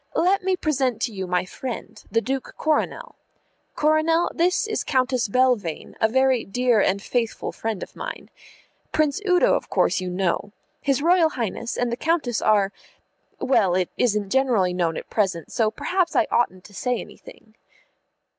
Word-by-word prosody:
"Let 375 +4 +3
me 380 0 +2
present 265 - 0
to 230 - -1
you 190 -2 -4
my 180 0 0
friend, 245 +5 -7
the 230 +3 +1
Duke 265 +2 -4
Coronel. 395 +10 -1 0.6
Coronel, 310 +2 +2
this 360 +4 +2
is 435 0 -2
Countess 255 -3 +1
Belvane, 225 -8 0
a 220 - +5
very 260 0 +2
dear 240 +1 +2
and 195 +1 +1
faithful 230 +2 -2
friend 220 -4 -4
of - - -11
mine. - - -7 0.6
Prince 310 +4 +1
Udo, 360 0 +4
of - - -1
course, - - +2
you 185 - -3
know. 190 +2 -1 0.3
His 280 0 0
Royal 340 -1 +4
Highness 235 -3 -4
and 245 -1 0
the 235 - -2
Countess 300 -7 0
are 205 -2 +3 0.7
well, 220 -9 +2
it 185 -1 0
isn't 210 -5 0
generally 240 -9 +2
known 170 -2 0
at - - -7
present, 190 -6 -1
so 225 -3 +2
perhaps 360 - -1
I 345 - +4
oughtn't 185 -6 +1
to 205 - -15
say 250 +4 -1
anything." 220 - -13
245 Hz, 165 wpm, -23 LUFS, 200-300 Hz, 0.7 s, a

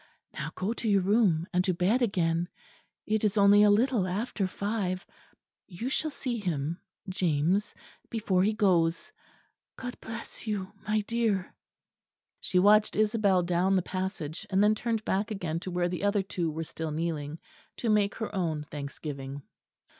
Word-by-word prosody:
Now - - -4
go 195 +5 -1
to 230 -1 -2
your 200 -2 +4
room, 190 -5 +3
and 180 0 +3
to 185 -2 0
bed 195 +9 +2
again. 175 -6 +1 0.6
It 215 0 0
is 210 0 +1
only 200 0 +7
a 210 - +7
little 220 -1 +3
after 200 +1 -1
five. 195 -2 -2 0.6
You 205 +7 -4
shall 310 +3 0
see 250 -5 -3
him 165 -3 -2 0.3
James 180 +1 +1 0.3
before 210 -5 +1
he 205 +3 +3
goes. 180 -6 +2 0.6
God 245 -1 -6
bless 225 +1 -8
you, 200 -3 -2 0.2
my 215 0 +2
dear!" 215 -4 -1 0.9
She 185 - -1
watched 210 +3 +5
Isabel 210 -4 +3
down 180 +2 +2
the 185 - +2
passage; 185 -4 -4
and 190 +1 +3
then 210 +1 +5
turned 220 0 -2
back 200 +2 0
again 180 -6 -2
to 185 - -6
where 175 0 0
the 180 +2 -4
other 205 -1 +2
two 175 -3 -2
were 160 +1 -3
still 160 0 -5
kneeling, 155 -1 -3 0.4
to 240 - -3
make 205 -1 +2
her 220 - -4
own 160 -5 -1
thanksgiving. 140 -1 -6
190 Hz, 160 wpm, -29 LUFS, 170-215 Hz, 0.9 s, only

